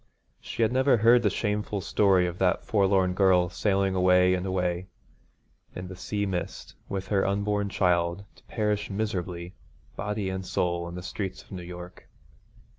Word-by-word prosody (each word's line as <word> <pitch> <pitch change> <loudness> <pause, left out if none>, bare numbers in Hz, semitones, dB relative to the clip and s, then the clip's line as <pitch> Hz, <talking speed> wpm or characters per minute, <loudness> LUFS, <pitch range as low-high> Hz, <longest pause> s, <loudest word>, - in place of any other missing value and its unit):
She 115 - -2
had 110 - +2
never 130 -1 +4
heard 115 +3 +5
the 105 - +2
shameful 105 0 -2
story 95 -1 +3
of 90 0 -4
that 95 -1 +1
forlorn 95 -3 +2
girl 90 -2 +4
sailing 95 0 +1
away 90 0 +4
and 90 +1 -1
away 90 -1 -1 0.9
in 90 0 -6
the 95 - -7
sea 100 +2 -2
mist, 90 -3 -4 0.2
with 95 -1 -4
her 100 -2 +2
unborn 100 +1 0
child, 90 0 +1
to - - -21
perish 105 -2 -1
miserably, 90 -4 -3 0.4
body 105 -1 -3
and 95 0 -4
soul, 85 -1 -1
in 85 - -8
the 90 - -6
streets 95 +1 -5
of - - -25
New 95 -2 -6
York. 90 0 -10
95 Hz, 165 wpm, -27 LUFS, 90-105 Hz, 0.9 s, heard